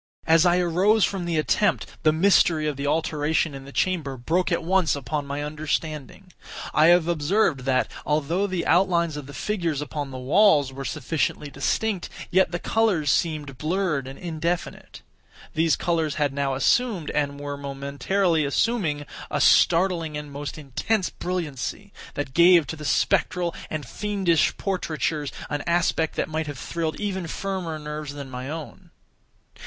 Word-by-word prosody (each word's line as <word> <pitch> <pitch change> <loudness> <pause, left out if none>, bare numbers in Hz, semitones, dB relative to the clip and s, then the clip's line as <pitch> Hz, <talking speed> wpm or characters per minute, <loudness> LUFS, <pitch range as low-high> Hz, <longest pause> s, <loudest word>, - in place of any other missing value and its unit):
As 165 +2 +5
I 175 0 +4
arose 185 +5 +3
from 190 -3 -3
the 170 -2 -1
attempt, 170 +4 +1 0.2
the 155 - +4
mystery 165 -2 +3
of 150 - -1
the 140 +1 -3
alteration 155 0 0
in 135 0 -9
the 140 - -10
chamber 155 -6 -1
broke 170 +10 0
at 170 - 0
once 180 -2 +2
upon 140 +2 -3
my 140 +1 -3
understanding. 155 +3 -4 0.4
I 155 +1 +5
have 175 -1 +5
observed 160 -4 +1
that, 130 -1 +2 0.2
although 155 +6 0
the 185 -3 -2
outlines 170 -3 +2
of 145 -2 -7
the 145 - -10
figures 170 -8 -1
upon 145 -1 -4
the 130 - -7
walls 145 0 +4
were 135 0 -6
sufficiently 150 0 -2
distinct, 215 +1 -1 0.2
yet 185 -2 +3
the 175 - -1
colors 185 -8 +1
seemed 150 -5 -1
blurred 155 -4 -1
and 135 - -8
indefinite. 170 0 -4 0.5
These 160 0 +3
colors 165 -4 0
had 145 -2 0
now 140 -1 -1
assumed, 200 - +1
and 145 -1 -1
were 145 0 -4
momentarily 140 +5 0
assuming, 150 - 0 0.2
a - - -1
startling 165 -3 +3
and 150 -1 -7
most 145 +2 -6
intense 165 - -1
brilliancy, 170 -7 -4 0.2
that 145 -2 -4
gave 170 0 +6
to 160 - -5
the 150 -1 -8
spectral 175 +3 +1 0.2
and 155 -3 -4
fiendish 185 - 0
portraitures 160 -6 -2 0.2
an 145 - -1
aspect 170 -2 +1
that - - -1
might 155 0 -3
have 145 -3 -6
thrilled 160 +3 -3
even 190 -4 -3
firmer 185 -3 -3
nerves 150 -1 -6
than 140 -2 -7
my 125 +1 -6
own. 155 -1 -8
160 Hz, 160 wpm, -24 LUFS, 145-180 Hz, 0.5 s, gave